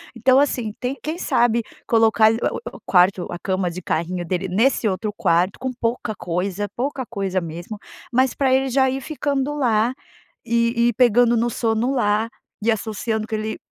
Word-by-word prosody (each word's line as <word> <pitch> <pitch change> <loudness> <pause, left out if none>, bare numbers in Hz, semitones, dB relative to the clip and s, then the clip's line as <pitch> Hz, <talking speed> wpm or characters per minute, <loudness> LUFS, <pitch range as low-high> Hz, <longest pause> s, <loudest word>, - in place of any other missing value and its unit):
então, 255 +3 +4
assim, 250 -6 0
tem 255 +2 -3
quem 315 +2 -4
sabe 235 -8 +2 0.3
colocar 225 -1 +4
o 225 - -1 0.2
o - - -9
o - - -17
quarto, 180 0 +3
a - - -4
cama 185 -1 -1
de 180 +2 -7
carrinho 175 +2 -2
dele 180 +2 -2
nesse 225 +5 +2
outro 205 +2 -2
quarto 175 +3 +1
com 260 +1 -2
pouca 235 -2 -2
coisa, 190 +3 -2
pouca 260 +1 -2
coisa 195 -5 -2
mesmo, 170 +5 -7 0.3
mas 260 +1 +2
pra 265 -2 +1
ele 265 0 +2
já 265 +1 +3
ir 265 +1 -3
ficando 285 -1 -2
lá 240 -4 +1 0.5
e 235 0 +2
e - - -1
pegando 240 0 +4
no 235 +1 +1
sono 230 +2 0
lá, 215 -3 +1 0.4
e 230 - +3
associando 220 0 -2
que 225 - -3
ele 215 0 -4
225 Hz, 180 wpm, -22 LUFS, 200-250 Hz, 0.5 s, então